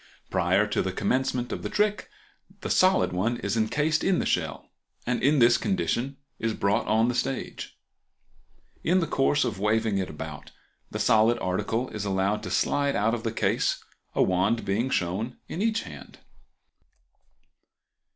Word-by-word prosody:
Prior 95 +2 +2
to 105 - 0
the 95 - -2
commencement 125 +5 -1
of - - -4
the - - -4
trick 210 0 0 0.5
the - - -3
solid 185 - +3
one 110 +7 0
is - - -2
encased 150 +8 +1
in 190 -2 +2
the - - -1
shell, 80 -5 -1 0.4
and 125 0 -1
in 145 +3 +3
this 120 -2 +5
condition 140 -8 -1 0.2
it 115 - -1
is 110 - 0
brought 105 +4 0
on 110 +2 +3
the 125 - 0
stage. 130 +2 -4 1.1
In 180 +3 +3
the 170 - +1
course 145 -1 +2
of 105 -5 -3
waving 105 0 +1
it 95 - -3
about, - - -8 0.4
the - - -5
solid 110 +2 +4
article 105 +7 -1
is 105 - -5
allowed 100 +1 0
to - - -6
slide 140 -1 +1
out 110 +3 +2
of 120 - -2
the 115 -1 -2
case, 115 - 0 0.3
a - - +4
wand 95 +6 +1
being 105 +6 0
shown 100 +5 -2
in 180 - -4
each 225 +1 +1
hand. - - -11
115 Hz, 165 wpm, -26 LUFS, 100-135 Hz, 1.1 s, this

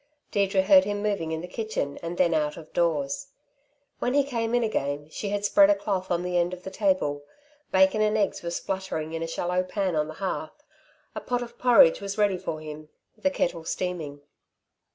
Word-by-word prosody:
Deirdre 195 -1 +2
heard 280 +7 +7
him 205 0 -3
moving 200 -6 -1
in 160 0 -2
the 180 - -7
kitchen 185 -8 -3
and 170 +1 -5
then 175 -2 +3
out 150 -1 0
of 160 -2 -12
doors. 160 - 0 0.7
When 250 +2 0
he 285 - +5
came 235 -4 -1
in 240 - +2
again, 145 -9 -2
she 205 - -4
had 205 0 -1
spread 295 +8 +6
a 305 - +5
cloth 190 -7 -2
on 175 0 0
the 180 0 0
end 175 +1 0
of 180 - -17
the 190 - -6
table. 185 -8 0 0.5
Bacon 190 +3 +4
and 215 0 +2
eggs 205 -2 0
were 170 - -4
spluttering 170 -3 -3
in 165 - -3
a 165 - -2
shallow 180 +2 -1
pan 185 -1 -2
on 150 0 +1
the 155 - -8
hearth, 195 - -4 0.5
a - - -5
pot 245 0 -1
of 235 0 -12
porridge 240 -10 +6
was 200 +1 -4
ready 205 -3 +2
for 155 -2 -4
him, 155 0 -9 0.3
the 285 - +1
kettle 260 - -1
steaming. 160 -5 -4
185 Hz, 205 wpm, -26 LUFS, 160-210 Hz, 0.7 s, heard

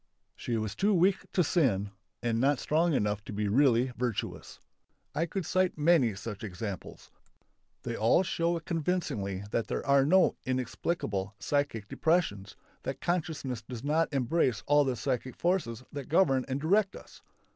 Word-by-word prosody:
She 120 -2 -2
was 110 -2 -2
too 205 +1 +2
weak 185 +2 +2
to 180 - +3
sin 110 - +1 0.3
and 115 -1 0
not 140 +1 +3
strong 160 +6 +1
enough 105 -4 0
to - - -7
be 105 0 -1
really 125 +2 +3
virtuous. 120 -3 -4 0.5
I 165 +3 0
could 190 +1 -3
cite 185 0 +1
many 150 - +3
such 105 0 -7
examples. 100 -1 -7 0.7
They 120 - -3
all 115 - +3
show 170 -1 0
convincingly 155 - -2
that 115 - 0
there - - -3
are 140 -1 +5
no 185 +6 +4
"inexplicable" 120 - -2
psychic 140 -8 -1
depressions, 160 - 0 0.3
that 135 0 -4
consciousness 155 -8 -2
does 120 +1 -8
not 155 +3 +1
embrace 130 -5 +1
all 145 0 +4
the 130 -2 0
psychic 130 0 -2
forces 155 - -1
that 140 -3 -6
govern 140 -6 +3
and 135 +1 -2
direct 195 +6 +2
us. - - -13
135 Hz, 155 wpm, -30 LUFS, 115-165 Hz, 0.7 s, are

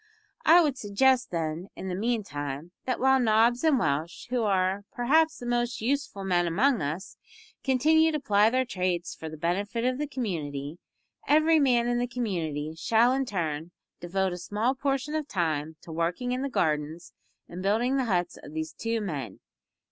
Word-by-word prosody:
"I 340 +2 +7
would 280 -4 -1
suggest, 255 +5 +2
then, 165 +1 -3
in 190 - -6
the 185 - -3
meantime, 175 - -3
that 255 -2 -1
while 265 0 +4
Nobbs 235 +2 +3
and 315 -4 +4
Welsh, 155 - -1
who 250 -1 +1
are, 195 -1 +1
perhaps, 315 +6 +2
the 245 - -8
most 240 0 -1
useful 265 -4 -2
men 175 -2 +1
among 225 +8 +2
us 155 +6 -4 0.5
continue 315 +5 +4
to 305 - -1
ply 210 -4 +4
their 255 +2 +1
trades 180 -5 -2
for 160 - -8
the 155 - -9
benefit 200 +8 -1
of 255 +1 0
the 295 - -1
community, 160 - -4 0.5
every 315 +2 +5
man 245 -4 +3
in 240 0 +1
the 245 - 0
community 165 - -3
shall 230 +7 +3
in 270 0 0
turn 165 -5 -3 0.3
devote 190 +1 -1
a 180 - -6
small 215 +8 0
portion 275 +1 -2
of 310 -2 -2
time 160 - -1
to 165 - -11
working 170 +10 -1
in 250 +1 -1
the 275 - -2
gardens 155 - -1 0.3
and 175 +1 -7
building 230 +7 +1
the 265 - +1
huts 180 -5 -1
of 150 - -11
these 160 0 -3
two 230 0 -2
men." 140 - -5
210 Hz, 180 wpm, -27 LUFS, 170-255 Hz, 0.5 s, I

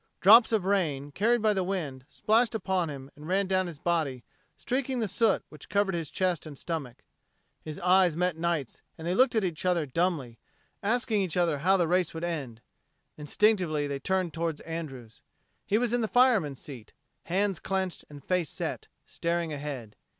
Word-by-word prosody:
Drops 225 +5 +8
of 215 -5 +1
rain, 155 -8 0
carried 225 +7 +2
by 215 -1 +4
the 190 -2 0
wind, 155 -9 -4
splashed 225 +2 +2
upon 190 -5 0
him 135 -1 -8
and 150 +1 -11
ran 195 +3 +2
down 185 -1 +1
his 170 -4 -8
body, 150 -7 -1 0.3
streaking 260 +1 -2
the 225 -3 0
soot 220 +2 +2
which 150 - -12
covered 200 0 +1
his 165 -4 -3
chest 180 -4 -1
and 145 -2 -9
stomach. 145 -8 -5 0.6
His 155 -1 -7
eyes 180 -2 +4
met 180 0 0
Knight's 165 -6 -2 0.2
and 160 - -8
they 175 - 0
looked 255 +4 +4
at 220 - +2
each 170 -4 -3
other 180 -4 +1
dumbly, 145 -5 -1 0.4
asking 225 0 +1
each 185 -3 -2
other 165 -5 +2
how 190 +6 +3
the 175 - +3
the - - 0
race 180 -1 +1
would 165 - -5
end. 140 -10 -4 0.5
Instinctively 155 -1 +1
they 140 -1 -3
turned 185 +2 -1
toward 165 -2 -2
Andrews. 135 -9 -7 0.5
He 210 - +3
was 240 0 0
in 245 - +2
the 220 - 0
fireman's 215 - +3
seat, 125 -7 -10 0.3
hands 195 0 0
clenched 190 -2 -2
and 145 -2 -12
face 180 -2 0
set, - - -4 0.2
staring 170 -1 -2
ahead. 140 -7 -6
175 Hz, 185 wpm, -28 LUFS, 150-195 Hz, 0.6 s, Drops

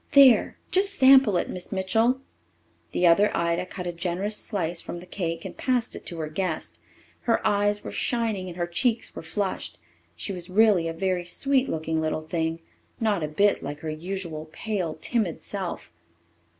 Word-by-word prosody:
There 275 -4 +7
just 390 +1 +2
sample 265 - +7
it, - - 0
Miss 180 -1 -6
Mitchell." 225 +7 +2 0.7
The 180 - +1
other 200 +5 +6
Ida 170 +1 0
cut 180 0 -6
a 175 - -1
generous 180 +4 -2
slice 175 -6 -2
from 175 - -6
the 175 - -11
cake 170 -3 -4
and - - -6
passed 250 -3 0
it - - -9
to 170 - -6
her 155 -1 -3
guest. 165 +1 -3 0.5
Her 230 - +2
eyes 205 0 +2
were - - -6
shining 225 -6 -1
and 175 -1 -8
her 175 - 0
cheeks 225 +7 -1
were - - -5
flushed. 190 +4 -3 0.4
She 85 - -4
was 180 0 -7
really 200 -4 +4
a 165 - -2
very 180 +1 -1
sweet 270 +8 +1
looking 160 0 -1
little 155 0 -1
thing 165 0 -2 0.4
not 215 -6 +1
a 155 - -1
bit 200 +7 +2
like 145 +1 -6
her 160 - -3
usual 160 -1 -5
pale, 180 -5 -3
timid 205 -3 0
self. 190 - -5
185 Hz, 175 wpm, -26 LUFS, 165-215 Hz, 0.7 s, There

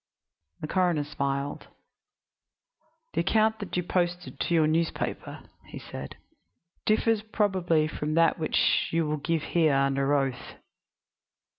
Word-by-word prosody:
The 155 - -3
coroner 175 -4 +1
smiled. 140 -1 -3 1.5
"The - - +1
account 220 +4 +2
that 200 -3 -4
you 180 - 0
posted 175 0 -2
to - - -1
your 160 -2 +4
newspaper," 160 +2 -2 0.2
he - - -9
said, 65 0 -8 0.7
"differs 220 0 +2
probably 190 -7 +1
from 155 0 -3
that 165 0 +3
which 155 - +2
you 165 -1 +1
will 150 0 -1
give 160 +2 -1
here 160 -4 +2
under 135 +1 +2
oath." 135 -3 -2
165 Hz, 125 wpm, -27 LUFS, 145-180 Hz, 1.5 s, your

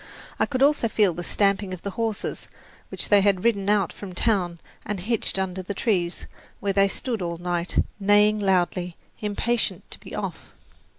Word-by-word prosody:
I - - +3
could 265 -1 +1
also 285 -4 +4
feel 210 -5 +3
the 175 - -5
stamping 195 0 +1
of 175 - -16
the 200 - -3
horses, 225 0 -3 0.4
which - - -3
they 205 -1 +6
had 195 -2 +2
ridden 205 -4 +2
out 210 -1 +2
from 190 -3 -9
town 180 -6 +1 0.3
and 205 -2 -3
hitched 215 +1 -1
under 190 -1 -2
the 195 +2 -5
trees, 180 -5 0 0.3
where 200 -1 0
they 195 0 +4
stood 230 +2 -3
all 170 -1 -3
night, 175 0 -2 0.2
neighing 205 +1 +4
loudly, 180 -2 +1 0.3
impatient 220 +3 0
to - - -9
be - - -9
off. - - -5
200 Hz, 175 wpm, -25 LUFS, 180-210 Hz, 0.4 s, they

